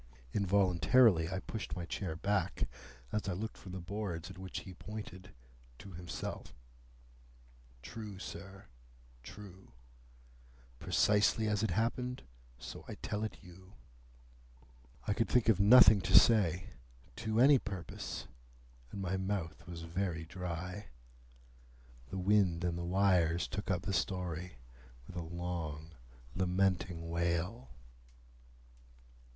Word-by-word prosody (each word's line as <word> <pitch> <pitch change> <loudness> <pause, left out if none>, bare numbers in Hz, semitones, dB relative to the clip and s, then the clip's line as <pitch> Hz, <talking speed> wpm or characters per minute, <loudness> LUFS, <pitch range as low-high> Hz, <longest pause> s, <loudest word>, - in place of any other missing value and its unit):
Involuntarily 95 -1 +4
I 95 +1 -3
pushed 110 -1 -5
my 85 - -4
chair 85 -2 -3
back, 95 0 0 0.4
as 105 -1 -1
I - - 0
looked 110 +5 -4
from 95 - -10
the 95 - -4
boards 90 -2 -4
at - - -11
which 95 0 -5
he 95 - -10
pointed 95 -1 -8 0.5
to 100 - -11
himself. 85 0 -6 1.3
"True, 105 - -7
sir. 95 +1 -8 0.6
True. 95 +1 -12 1.1
Precisely 105 +1 +3
as 105 -1 +1
it 110 - +1
happened, 120 +6 -1 0.3
so - - -8
I - - -6
tell 105 +1 -3
it 110 - -5
you." 95 +2 -14 1.3
I - - +1
could 115 +1 0
think 120 -2 +3
of 105 -4 +4
nothing 105 -1 +8
to 95 0 +6
say, 95 -6 +4 0.5
to 110 -1 -1
any 135 +2 +7
purpose, 95 -6 -6 0.7
and 100 - -5
my 95 +1 -1
mouth 95 -5 -3
was 85 -1 -7
very 85 -1 -2
dry. 90 +3 -5 1.2
The 95 - -4
wind 95 -3 +3
and 85 -1 0
the 85 - -4
wires 90 -2 +3
took 100 +3 -5
up 90 -2 0
the 100 - -2
story 90 -2 -2 0.5
with 90 - -11
a 90 - -2
long 80 -2 -4 0.4
lamenting 90 -2 0
wail. 85 +8 -1
95 Hz, 125 wpm, -34 LUFS, 85-105 Hz, 1.3 s, nothing